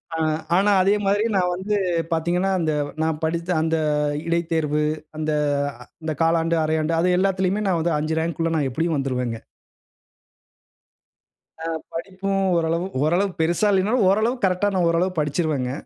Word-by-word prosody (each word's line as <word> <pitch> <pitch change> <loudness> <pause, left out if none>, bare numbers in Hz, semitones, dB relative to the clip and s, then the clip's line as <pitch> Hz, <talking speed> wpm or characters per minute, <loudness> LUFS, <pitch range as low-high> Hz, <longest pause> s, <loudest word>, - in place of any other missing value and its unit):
ஆ - - -2 0.4
ஆனா, 205 +2 +3
அதே 195 +2 +3
மாதிரி 205 +2 +2
நான் 180 -1 +2
வந்து 195 +3 -2 0.4
பாத்தீங்கன்னா, 175 +4 +1
அந்த 155 -2 0 0.3
நான் 160 -1 -1
படித்த 170 +2 -2
அந்த 160 0 +1 0.5
இடைத்தேர்வு, 160 -3 0 0.3
அந்த 155 0 -1 0.7
இந்த 160 0 -2
காலாண்டு, 165 0 +2
அரையாண்டு 155 +1 0
அது 180 +1 +2
எல்லாத்திலயுமே 190 +1 +1
நான் 180 -3 +1
வந்து 165 -1 +1
5 155 +1 -2
ரேங்க் 165 0 -3
உள்ள 165 0 +1
நான் 140 -3 0
எப்படியும் 160 +2 0
வந்துருவேங்க. 125 -4 -2 2.3
ஆ - - -2 0.3
படிப்பும் 195 +3 -2
ஓரளவு 170 +2 0 0.2
ஓரளவு 180 +6 +2
பெருசா 170 +6 +2
இல்லைனாலும், 205 +4 +2
ஓரளவுக்கு 220 +2 +1
கரெக்ட்டா 190 +2 +1
நான் 175 -2 +2
ஓரளவு 175 +3 +1
படித்துருவேங்க, 150 -4 -1
170 Hz, 140 wpm, -23 LUFS, 160-190 Hz, 2.3 s, ஆனா